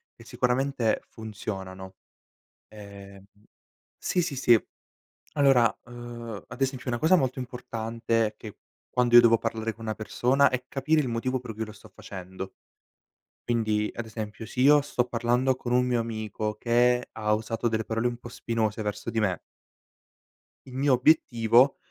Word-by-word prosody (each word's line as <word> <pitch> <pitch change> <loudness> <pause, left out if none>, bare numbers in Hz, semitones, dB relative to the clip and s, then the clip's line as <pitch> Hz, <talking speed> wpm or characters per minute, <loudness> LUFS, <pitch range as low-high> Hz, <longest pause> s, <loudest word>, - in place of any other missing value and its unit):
che 115 - -15
sicuramente 125 0 0
funzionano, 95 -3 -7 0.7
ehm 100 -2 -12 0.8
Sì, 180 - 0
sì, 165 -4 -3
sì, 120 -3 +5 0.8
allora, 135 -6 +4
uhm, 120 -3 -8
ad - - -11
esempio 130 -1 -2
una 120 - -1
cosa 160 +8 +5
molto 130 -5 0
importante 115 -2 -2
è 105 - -6
che 105 -2 -10 0.3
quando 125 -1 +1
io 120 - +12
devo 115 -1 +5
parlare 115 0 -2
con 115 - -11
una 110 -1 -2
persona 125 +6 +2
è 125 0 -2
capire 155 +3 +1
il 135 - -1
motivo 125 +2 -1
per 120 -3 -8
cui 110 +1 -3
lo 110 - -10
sto 105 - -16
facendo 95 0 -8 0.9
quindi 110 -3 +1
ad 120 - -4
esempio 110 -1 -6
se 115 - -11
io 145 +3 +7
sto 135 -3 0
parlando 125 +2 +1
con 125 - -6
un 125 0 +3
mio 120 -2 +1
amico 110 -2 -3
che 125 +2 +2
ha 105 -1 -1
usato 115 +2 -2
delle 110 -1 -1
parole 115 +2 0
un 120 - -4
po' 120 - -10
spinose 115 -3 -2
verso 105 +2 -4
di 115 -1 0
me 95 -6 0 1.3
il 130 - -10
mio 135 +1 +3
obiettivo 125 -2 +4
115 Hz, 160 wpm, -27 LUFS, 110-125 Hz, 1.3 s, io